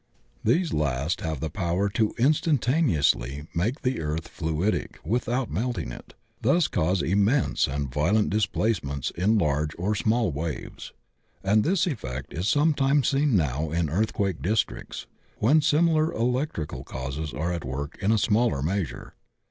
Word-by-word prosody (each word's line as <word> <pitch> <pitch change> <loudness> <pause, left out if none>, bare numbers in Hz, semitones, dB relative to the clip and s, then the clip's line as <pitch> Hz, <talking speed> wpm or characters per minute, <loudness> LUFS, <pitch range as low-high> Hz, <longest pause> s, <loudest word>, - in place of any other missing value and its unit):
These 170 -2 +2
last 70 +2 -1
have 80 -5 -3
the 80 - -3
power 90 +2 0
to 110 +2 0
instantaneously 120 - +2
make 110 - -1
the 125 -5 0
earth 80 +2 -3
fluidic 80 +6 -1
without 120 +5 -1
melting 110 - -2
it, - - -11 0.3
thus 150 +8 +3
causing 85 -2 0
immense 105 +8 +2
and 70 -1 -3
violent 100 +10 +2
displacements 95 - 0
in 105 +6 +2
large 75 -3 0
or 95 +5 0
small 110 -1 +1
waves. 75 +2 -5 0.5
And 105 +2 +3
this 185 +1 +2
effect 65 - -5
is 85 +6 -2
sometimes 145 -2 +3
seen 140 -3 +2
now 75 -2 0
in 80 -1 -1
earthquake 100 -1 0
districts 105 +3 -2 0.3
when 140 +9 +4
similar 155 +1 +3
electrical 125 - -2
causes 70 +4 -5
are 85 +3 -2
at 85 - -4
work 70 - -5
in 100 +2 +2
a 110 - +4
smaller 110 - +2
measure. 85 -6 -3
95 Hz, 140 wpm, -26 LUFS, 75-125 Hz, 0.5 s, when